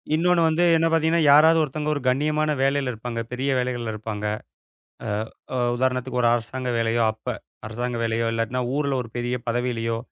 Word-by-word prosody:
இன்னொன்னு 175 +1 +3
வந்து 160 +2 +2
என்ன 165 +1 +2
பார்த்தீங்கன்னா, 165 +1 +2
யாராவது 160 +3 +7
ஒருத்தங்க 150 +1 -4
ஒரு 145 - -3
கண்ணியமான 150 +3 +1
வேலையில 135 -1 +1
இருப்பாங்க. 115 +1 -5
பெரிய 135 +2 -1
வேலைகள்ல 125 -3 -2
இருப்பாங்க. 105 -1 -5 0.8
அ, - - -3 0.5
அ, - - -1 0.2
உதாரணத்துக்கு 125 0 -1
ஒரு 120 - +4
அரசாங்க 125 +2 -4
வேலையோ! 115 +1 +1
அப்ப, 110 - -25 0.4
அரசாங்க 120 +2 -3
வேலையோ! 115 0 0
இல்லாட்டின்னா 115 +3 -1
ஊர்ல 140 -2 0
ஒரு 115 - -11
பெரிய 120 +1 -1
பதவியிலயோ! 115 -1 -1
125 Hz, 160 wpm, -24 LUFS, 115-150 Hz, 0.8 s, யாராவது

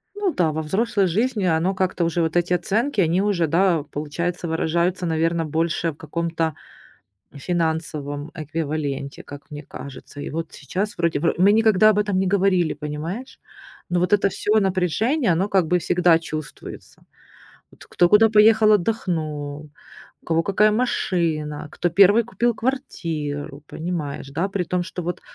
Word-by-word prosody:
Ну 405 -4 -1
да 165 -3 +1
во 160 +1 -3
взрослой 200 +4 +1
жизни 215 +3 0
оно 170 +3 +1
как-то 185 -2 0
уже 170 +1 0
вот 160 +1 -1
эти 175 +1 +2
оценки, 210 - 0
они 170 +3 +2
уже, 190 -6 +1
да, 170 -1 +2
получается 160 +4 -4
выражаются, 170 +3 0
наверно, 165 0 0
больше 165 +1 -1
в - - -15
каком-то 165 0 -2 0.8
финансовом 155 -2 -3
эквиваленте, 150 -3 -4
как 145 +1 -12
мне 145 0 -6
кажется. 140 +1 -10
И - - -5
вот 165 +1 -4
сейчас, 190 +8 -4
вроде 170 -4 0
бы 165 - +1
Мы 195 +3 +5
никогда 215 -1 +5
об 210 -1 +2
этом 200 -2 0
не 190 0 +1
говорили, 185 -3 +2
понимаешь? 155 - -6 0.5
Но 175 0 +1
вот 180 +3 +1
это 200 -1 +3
всё 215 +3 +1
напряжение, 195 - +1
оно 190 +5 0
как 190 -4 +3
бы 180 +1 +2
всегда 175 -1 +3
чувствуется. 155 -2 -8 0.7
Вот - - -16
кто 175 0 +2
куда 215 +1 +6
поехал 215 0 +5
отдохнул, 155 -8 -1 0.5
у - - -28
кого 165 0 +2
какая 210 +3 +3
машина, 165 -10 -1
кто 175 - -1
1 200 +6 +5
купил 240 0 -1
квартиру, 155 - -4
понимаешь, 155 -5 -5
да? 170 +7 -1
При 190 -2 -1
том, 180 +1 -1
что 180 0 -6
вот, 175 +1 -4
175 Hz, 155 wpm, -22 LUFS, 155-195 Hz, 0.8 s, куда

